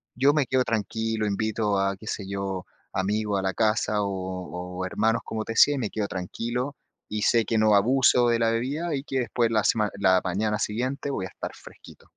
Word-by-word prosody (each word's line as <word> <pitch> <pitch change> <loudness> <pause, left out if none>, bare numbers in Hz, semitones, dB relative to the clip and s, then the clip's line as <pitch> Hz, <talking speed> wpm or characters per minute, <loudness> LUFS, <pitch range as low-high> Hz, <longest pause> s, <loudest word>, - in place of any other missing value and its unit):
yo 140 +4 +4
me 150 -3 +2
quedo 130 -1 +2
tranquilo, 110 0 -1
invito 105 0 0
a, 100 0 0
qué 110 - -13
sé 100 - -3
yo, 95 -2 -3 0.3
amigos 100 +1 0
a - - -3
la 95 -1 0
casa 105 -1 +1
o 90 -2 -5
o 95 - -1
hermanos, 110 +5 +1
como 110 -1 -3
te 115 - -4
decía 145 +5 +6
y, - - -2
me 110 - -2
quedo 105 -2 -2
tranquilo 120 +9 -3 0.3
y, 105 -1 -2
sé 115 +1 +4
que 115 - 0
no 110 -1 +4
abuso 125 +2 +4
de 115 - +3
la 115 0 +2
bebida 145 +8 -1
y, 135 - -3
que 135 -3 -2
después 120 -1 0
la 110 -2 +2
sema 105 -2 +2
la 95 -2 +4
mañana 105 +4 -1
siguiente 130 +7 -2
voy 95 -8 -2
a - - -7
estar - - -6
fresquito. - - -15
110 Hz, 210 wpm, -26 LUFS, 100-120 Hz, 0.3 s, decía